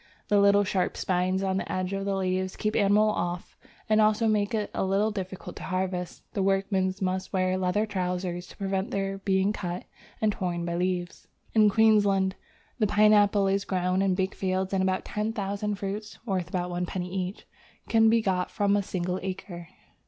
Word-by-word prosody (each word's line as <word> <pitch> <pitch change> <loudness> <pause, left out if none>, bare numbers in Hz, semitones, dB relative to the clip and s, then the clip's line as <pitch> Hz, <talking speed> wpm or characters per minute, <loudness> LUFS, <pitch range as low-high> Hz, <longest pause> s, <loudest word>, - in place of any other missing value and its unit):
The 205 - +4
little 200 0 +5
sharp 185 -1 -1
spines 185 +1 0
on 190 -1 0
the - - -3
edges 185 +1 -2
of 195 - -4
the 200 -1 0
leaves 185 0 -1
keep 215 0 -2
animals 210 +1 +4
off, 175 +1 -3 0.3
and 215 0 +4
also 215 +1 +3
make 210 0 +1
it 210 -1 -2
a - - -1
little 195 +3 +1
difficult 190 -2 -6
to - - -8
harvest. 185 -1 -3
The 205 - -1
workmen 195 -1 +1
must 185 0 -2
wear 185 -1 +1
leather 185 +3 +1
trousers 180 -3 -3
to - - -15
prevent 195 +1 -2
their 195 -3 -2
being 195 +1 +1
cut 180 -3 -4 0.4
and 215 -1 +2
torn 175 -3 -3
by 170 - -3
the 170 - -1
leaves. 180 -1 -2 0.3
In 215 -2 +6
Queensland 205 -3 +3 0.5
the 215 - +3
pineapple 205 -1 +4
is 195 0 +1
grown 185 0 0
in 195 -2 +2
big 190 0 -1
fields, 190 0 -1
and 190 - +2
about 190 0 0
ten 215 +1 -2
thousand 205 -1 -2
fruits 200 +2 -5
(worth 185 -5 -2
about 180 -1 -2
one 175 0 -2
penny 180 0 -4
each) 185 +1 -4 0.4
can 225 -1 +5
be 225 0 +3
got 185 -3 0
from 200 0 +1
a 205 - +2
single 185 -1 -3
acre. 185 -2 -6
195 Hz, 190 wpm, -27 LUFS, 185-205 Hz, 0.5 s, In